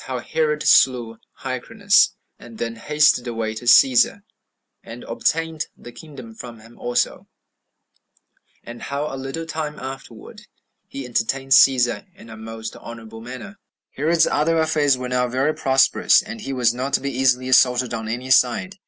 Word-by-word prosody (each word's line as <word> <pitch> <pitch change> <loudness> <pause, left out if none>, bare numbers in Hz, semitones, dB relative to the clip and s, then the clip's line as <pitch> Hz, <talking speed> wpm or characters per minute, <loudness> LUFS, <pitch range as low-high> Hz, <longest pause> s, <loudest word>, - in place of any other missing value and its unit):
How 130 -1 -4
Herod 150 +4 -1
Slew 120 -4 +3 0.2
Hyrcanus 200 - +1 0.2
And 115 -2 -13
Then 115 0 -4
Hasted 150 0 +2
Away 115 -2 -3
To 110 +2 -9
Cæsar, 125 +1 +4 0.6
And 115 +2 -10
Obtained 160 +7 -2
The 120 - -12
Kingdom 130 -3 -12
From 115 0 -10
Him 115 +2 -18
Also; 120 0 -2 1.4
And 120 0 -10
How 140 +1 -4
A - - -4
Little 135 +5 -6
Time 155 -2 -5
Afterward, 130 -4 -10 0.4
He 135 -1 -7
Entertained 135 +3 -2
Cæsar 130 +6 +4
In 115 -12 -14
A - - -9
Most 110 0 -8
Honorable 115 -1 -11
Manner. 125 +6 -8 0.5
1. - - -30
Herod's 160 +4 +2
other 165 +3 +1
affairs 150 -4 +2
were 125 0 -5
now 125 0 0
very 130 +5 0
prosperous, 135 -2 +3
and 220 +1 -9
he 135 - -6
was 125 -3 +1
not 130 +3 -4
to - - +3
be 140 0 -4
easily 130 -1 +1
assaulted 125 -1 +3
on 110 -1 -4
any 125 +3 -4
side. 160 +12 +2
130 Hz, 160 wpm, -21 LUFS, 120-150 Hz, 1.4 s, Cæsar